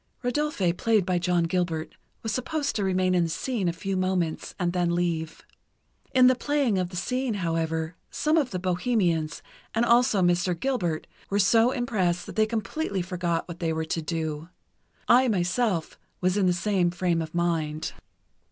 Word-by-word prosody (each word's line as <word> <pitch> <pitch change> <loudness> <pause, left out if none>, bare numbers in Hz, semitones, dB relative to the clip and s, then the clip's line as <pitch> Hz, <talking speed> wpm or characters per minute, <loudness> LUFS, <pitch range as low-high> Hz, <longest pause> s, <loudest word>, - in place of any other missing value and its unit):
Rodolphe, 245 - 0
played 215 +1 +2
by 180 -1 +1
John 175 -1 +1
Gilbert, 165 -2 -1 0.3
was 225 - -2
supposed 285 +3 -2
to 210 - 0
remain 185 -1 +2
in 175 -2 +3
the - - -3
scene 210 +3 -2
a - - +2
few 195 +3 -3
moments 185 -3 -1
and 175 -2 0
then 175 -1 +1
leave. 165 -3 -2 0.7
In 255 -1 +5
the 255 - +7
playing 260 -5 +1
of 180 -1 -1
the 180 - -10
scene, 250 +5 -1
however, 165 -2 -1
some 305 +1 +1
of 295 -6 +2
the 185 - -3
bohemians, 180 -3 0 0.3
and 230 +2 +3
also 235 -4 +4
Mr. 175 0 +2
Gilbert, 180 -13 -1 0.2
were 200 - 0
so 225 +4 +5
impressed 195 -9 0
that - - -9
they 215 0 +3
completely 215 - -2
forgot 175 -2 -2
what 170 -1 -8
they 165 -2 0
were 160 0 -2
to 165 +1 -2
do. 160 0 -3 0.6
I, 255 +2 +6
myself, 185 -2 0 0.2
was 185 0 +1
in 200 -2 +3
the - - +4
same 185 0 +1
frame 175 -1 0
of 160 +1 -6
mind. 160 -3 -1
180 Hz, 175 wpm, -26 LUFS, 170-225 Hz, 0.7 s, the